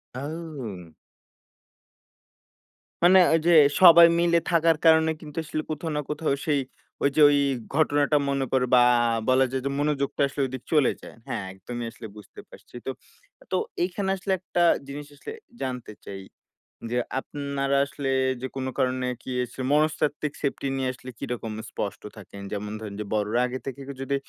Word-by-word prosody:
আও! 135 - -7 2.1
মানে 185 +2 +7
ওইযে 165 +1 +3 0.3
সবাই 170 -2 +10
মিলে 170 0 +3
থাকার 165 -1 +3
কারণে 160 0 +5
কিন্তু 150 -2 -11
আসলে 155 0 -3
কোথাও 160 +1 -4
না - - 0
কোথাও, 150 -1 -1
সেই 150 -3 +2 0.4
ওইযে 140 +2 +1
ওই 145 - +3 0.4
ঘটনাটা 145 -1 +2
মনে 140 -1 0
কর 130 - +2
বা 125 - +8 0.5
বলা 130 +1 +5
যায় 130 0 -2
যে - - +1
মনোযোগটা 145 -2 -1
আসলে 140 +1 -4
ওইদিকে 130 -1 -7
চলে 150 -4 +4
যায়। - - -12
হ্যাঁ, 105 - -3
একদমই 120 +5 -6
আসলে 110 - -10
বুঝতে 105 - -13
পারছি - - -16
তো। - - -3 0.6
তো - - +1 0.3
এইখানে 190 +2 -2
আসলে 190 +1 -4
একটা 175 -1 -2 0.3
জিনিস 145 +1 -7
আসলে 145 - -9 0.3
জানতে 125 -4 -4
চাই। 95 -1 -7 0.7
যে, 120 - 0 0.2
আপনারা 140 0 -2
আসলে 140 0 -5 0.3
যে 130 - -3
কোন 135 -1 -3
কারণে 130 0 0 0.2
কি - - -10
এছ 125 - -9 0.2
মনস্তাত্ত্বিক 150 -1 +1
সেফটি 140 -1 -2
নিয়ে 130 -1 -1
আসলে 130 0 -11
কিরকম 115 -3 -4 0.2
স্পষ্ট 100 - -5 0.2
থাকেন? 100 0 -11
যেমন 105 0 -4
ধরেন 105 -2 -7
যে - - -4
বড়রা 105 +2 0
আগে 130 +1 -5
থেকে 135 0 -6 0.2
যদি 135 +1 -1
140 Hz, 155 wpm, -25 LUFS, 125-155 Hz, 2.1 s, সবাই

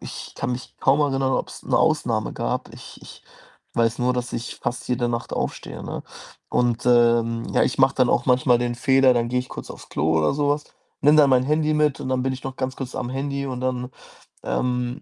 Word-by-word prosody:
ich - - -8
kann - - -3
mich 125 +1 -7
kaum 140 +3 +3
erinnern, 135 -2 +1
ob's - - -3
'ne - - +1
Ausnahme - - +1
gab. - - -3
Ich - - -12
ich - - -13 0.5
weiß 115 0 +1
nur, 125 +1 +2
dass 125 -1 -3
ich 120 +1 -5
fast 120 0 -4
jede 125 -1 0
Nacht 115 0 -3
aufstehe, - - -4
ne? - - -5 0.5
Und, 120 -1 0
ähm, 115 -1 +3
ja, - - +3
ich 125 - 0
mache 135 0 +4
dann 130 -2 +3
auch 120 - +1
manchmal 125 -1 +4
den 120 0 -1
Fehler, 130 +1 +4
dann 120 -1 0
gehe 125 - 0
ich 125 - -4
kurz - - -8
aufs - - -11
Klo 80 +2 +1
oder 75 - +2
so 145 0 0
was, 145 +1 0 0.4
nehme 150 +2 +5
dann 145 -2 +6
mein 125 -1 +4
Handy 155 +2 +1
mit 150 -2 +1
und - - -4
dann 130 -1 0
bin 130 0 0
ich 130 - -7
noch 135 -1 -5
ganz 130 0 -3
kurz 130 -2 -6
am 125 -1 -3
Handy 140 +1 -3
und 130 -2 -4
dann, 125 0 -2 0.5
ähm 125 0 -2
125 Hz, 225 wpm, -23 LUFS, 120-135 Hz, 0.5 s, dann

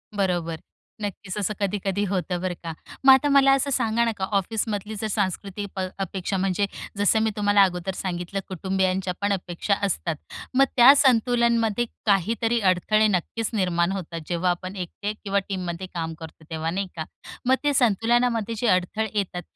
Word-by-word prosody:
बरोबर, 175 -5 -1 0.4
नक्कीच 200 -1 -5
असं 210 +1 -1
कधी-कधी 200 0 -1
होतं 180 -2 -1
बरं 185 -1 -1
का. 165 -1 -4 0.3
मग 270 - +10
आता 265 +2 +3
मला 275 -1 +6
असं 275 +1 +1
सांगा 235 -3 +2
नका, 210 -5 -1
ऑफिसमधली 210 +1 -2
जर 220 - -1
सांस्कृतिक 200 0 -2
प - - -4 0.2
अपेक्षा, 190 0 -2
म्हणजे 195 +1 +1 0.3
जसं 205 +2 +3
मी 220 - +2
तुम्हाला 205 -1 +5
अगोदर 180 0 -1
सांगितलं 180 +1 -3
कुटुंबीयांच्या 190 0 -1
पण 205 0 +2
अपेक्षा 180 +1 -2
असतात, 170 -3 -1 0.4
मग 270 +1 +5
त्या 250 +3 +9
संतुलनमध्ये 235 -3 +3 0.2
काहीतरी 225 +4 +2
अडथळे 205 +3 +3
नक्कीच 210 +3 -1
निर्माण 180 -4 +1
होतात 170 -4 -5
जेव्हा 175 +1 0
आपण 185 +2 -5
एकटे 200 +3 -4
किंवा 200 -1 +1
टीममध्ये 185 -1 -4
काम 165 -1 -3
करतो 160 -1 -11
तेव्हा, 160 0 -2
नाही 195 +2 -2
का. 160 -1 -4 0.4
मग 260 +1 +5
ते 290 - +2
संतुलनामध्ये 230 -1 +2
जे 240 - 0
अडथळे 195 +3 +1
येतात, 190 -3 -2
200 Hz, 160 wpm, -24 LUFS, 180-225 Hz, 0.4 s, मग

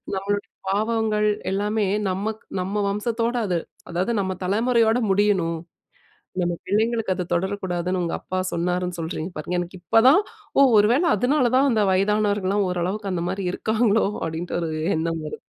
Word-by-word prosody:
நம்மளோட 200 +1 -1 0.2
பாவங்கள் 215 +1 +1 0.2
எல்லாமே 205 +1 0 0.2
நமக்கு 210 +4 -3 0.2
நம்ம 200 +3 -1
வம்சத்தோட 230 +3 -1
அத 180 - 0 0.4
அதாவது 185 +7 0
நம்ம 190 -1 -2
தலைமுறையோடு 230 +3 +2
முடியணும். 190 -4 +2 0.9
நம்ம 175 0 0
பிள்ளைங்களுக்கு 220 0 +1
அது 180 - -3
தொடரக்கூடாதுன்னு 185 -1 -1
உங்க 170 - -2
அப்பா 185 - -4
சொன்னாருன்னு 180 +1 -1
சொல்றீங்க 160 +1 -4
பாருங்க. 155 +4 -2
எனக்கு 175 +1 -7
இப்பதான் 235 - +5 0.4
ஓ - - +7 0.2
ஒருவேள 235 +10 +4
அதுனால 250 +3 +2
தான் 275 +2 +4
அந்த 220 -3 +2
வயதானவர்கள்லாம் 205 0 +1
ஓரளவுக்கு 190 +3 -2
அந்த 170 -2 -2
மாரி 190 +1 -3
இருக்காங்களோ, 220 +1 +2 0.2
அப்டின்ற 165 +2 -3
ஒரு 160 -1 -2 0.2
எண்ணம் 165 0 -2
வருது. 150 - -7
200 Hz, 140 wpm, -23 LUFS, 180-220 Hz, 0.9 s, ஓ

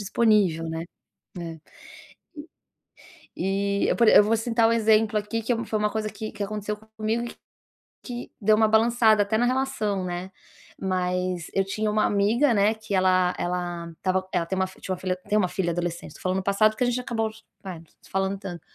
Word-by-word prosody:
disponível, 200 -6 +2
né. 160 +1 -4 0.5
É, 165 -1 -6 1.8
e 200 +1 0
e - - +1
eu - - +2
por 235 - +3
e - - +7
eu 205 - +8
vou 225 +2 +2
citar 230 0 +2
um - - +2
exemplo 220 -1 +3
aqui 220 +2 -2
que 240 +3 +1
é 230 - -3
foi 215 - -1
uma 210 0 +1
coisa 215 -1 -2
que 215 +1 -6
que 210 - -9
aconteceu 210 +1 -3 0.2
comigo 220 +2 -1
e - - -4
que - - -13 0.7
que 245 -1 -7
deu 215 0 +4
uma 220 0 +4
balançada 220 -1 +4
até 220 +2 0
na 245 - +3
relação, 245 -7 -1
né. 180 +1 -4 0.5
Mas 180 -2 -1
eu 195 - +2
tinha 215 +2 -2
uma 215 0 +2
amiga, 225 +7 +3
né, 210 +2 +3
que 220 -2 -6
ela 185 -1 +3
ela 175 -1 -3
estava 185 0 -1
ela 170 - 0
tem 190 - -3
uma 190 0 +1
fi 190 - -17
tinha 185 - -3
uma - - -11
fi 185 -1 -1
tem 210 - +3
uma 185 - +2
filha 175 -1 -1
adolescente, 175 0 -4
tô - - -14
falando 185 +1 0
no 190 - -3
passado, 200 +2 +4
porque 250 - -1
a 245 - +1
gente 245 +1 0
acabou 225 -3 -1 0.4
é, 180 -3 -5
não - - -16 0.2
se - - -19
falando 195 0 -1
tanto. 180 -3 -7
205 Hz, 215 wpm, -25 LUFS, 185-220 Hz, 1.8 s, eu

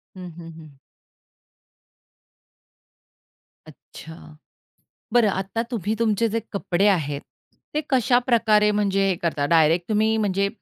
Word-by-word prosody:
हं, 180 -1 -9
हं, 165 -1 -10
हं. 155 -3 -15 2.9
अच्छा! 160 -1 -14 0.8
बरं 235 -3 +4
आता 195 +4 -3
तुम्ही 215 -3 -2
तुमचे 230 0 +1
जे - - +1
कपडे 200 -1 0
आहेत, 145 -7 0 0.5
ते 305 - 0
कशाप्रकारे 235 -5 +3
म्हणजे 195 -1 +1
हे 185 - 0
करता? 155 -4 -1
डायरेक्ट 165 +3 +2
तुम्ही, 220 +1 +2
म्हणजे 200 -2 0
200 Hz, 105 wpm, -23 LUFS, 170-220 Hz, 2.9 s, बरं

